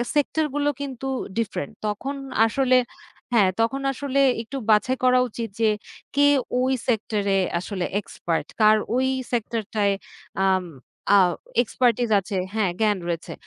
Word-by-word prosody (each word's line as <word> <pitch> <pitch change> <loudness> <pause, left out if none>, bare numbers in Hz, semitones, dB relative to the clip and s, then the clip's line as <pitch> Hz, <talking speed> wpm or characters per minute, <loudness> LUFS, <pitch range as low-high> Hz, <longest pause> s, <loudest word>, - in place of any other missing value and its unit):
Sector 305 +2 +1
গুলো 290 0 +1
কিন্তু 270 -1 -5 0.3
different. 225 0 -2 0.2
তখন 265 +7 -3 0.3
আসলে 255 +2 +3 0.6
হ্যাঁ, 200 -5 +5
তখন 270 +4 0
আসলে 275 +1 -1 0.2
একটু 265 +4 -7
বাছাই 245 +5 +3
করা 255 0 +5
উচিত 230 +1 -5
যে 220 - +4 0.5
কে 285 0 +5 0.3
ওই 260 +1 +2
সেক্টরে 210 -4 0 0.2
আসলে 185 0 -3
এক্সপার্ট? 170 -4 -3
কার 215 0 +7 0.2
ওই 260 +1 +2 0.2
সেক্টর 230 -1 -1
টায় 200 -1 +3 0.5
আম 185 -1 +2 0.5
আ - - +8 0.5
expertise 240 -1 +1
আছে 195 0 -4 0.2
হ্যাঁ, 205 -5 +1
জ্ঞান 210 -2 +3
রয়েছে। 170 -1 -3
230 Hz, 135 wpm, -24 LUFS, 205-260 Hz, 0.6 s, আ